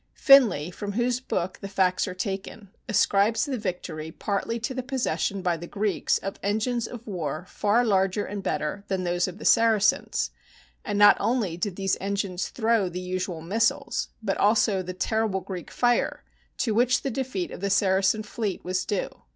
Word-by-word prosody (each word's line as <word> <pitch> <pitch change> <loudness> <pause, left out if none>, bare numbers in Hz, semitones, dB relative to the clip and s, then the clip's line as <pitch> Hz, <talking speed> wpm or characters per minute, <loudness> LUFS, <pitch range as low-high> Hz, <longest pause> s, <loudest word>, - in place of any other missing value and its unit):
Finlay, 225 - +5
from 205 +2 -5
whose 240 +2 +1
book 185 -7 -3
the 195 - -5
facts 190 -2 +1
are 185 - -5
taken, 195 +1 -5 0.2
ascribes 210 +2 +3
the 280 -3 -2
victory 175 -7 -4
partly 210 +6 -2
to 240 +4 -3
the 255 - -3
possession 250 -7 -2
by 175 -2 +1
the 170 +1 -8
Greeks 205 +2 0
of 195 - -6
engines 220 +3 -1
of 240 -1 -9
war 170 -5 -4
far 215 +6 +1
larger 195 -1 +1
and 205 -1 -5
better 190 +2 -2
than 190 -1 -1
those 175 0 0
of 185 +1 -7
the - - -9
Saracens; 220 -2 +3 0.5
and 205 - -2
not 205 0 +7
only 225 -8 0
did 180 +2 -3
these 195 -1 0
en 200 +1 -1
gines 190 -2 -2
throw 225 -5 +1
the 180 +1 -5
usual 180 -2 -3
missiles, 220 +7 0
but 195 -3 -1
also 205 -2 +3
the 185 0 -6
terrible 215 0 0
Greek 185 -2 -7
fire 245 -1 +1 0.3
to 230 -4 0
which 245 +3 +2
the 275 - -1
defeat 245 -8 -3
of - - -7
the 200 - 0
Saracen 195 +2 +2
fleet 210 -2 -4
was 185 +1 -1
due. 205 - -3
200 Hz, 180 wpm, -26 LUFS, 185-225 Hz, 0.5 s, not